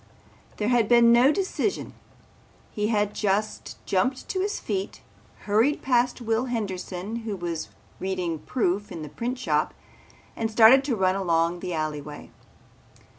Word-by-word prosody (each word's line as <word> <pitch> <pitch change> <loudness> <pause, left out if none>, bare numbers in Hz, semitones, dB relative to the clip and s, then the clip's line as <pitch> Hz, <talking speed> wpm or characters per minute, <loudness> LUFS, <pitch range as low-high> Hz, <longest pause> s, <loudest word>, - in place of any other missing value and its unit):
There 210 +1 0
had 240 -4 +2
been 235 -1 +6
no 250 +4 +6
decision. 390 +3 -2 0.8
He 210 0 -1
had 210 -2 0
just 210 +1 -2
jumped 255 +8 0
to 375 - -1
his 410 +2 -1
feet, 195 -2 -4 0.4
hurried 225 +8 +1
past 250 -1 +1
Will 225 +1 0
Henderson 200 -3 -4
who 220 -3 -4
was 170 -3 -4 0.3
reading 180 -4 -2
proof 205 - -1
in 160 - -6
the 150 - -7
printshop 245 - -1 0.6
and 225 -1 -2
started 225 +4 +7
to 265 -5 0
run 185 -2 +2
along 170 -2 +1
the 180 -1 -4
alleyway. 150 -1 -5
210 Hz, 135 wpm, -25 LUFS, 185-240 Hz, 0.8 s, started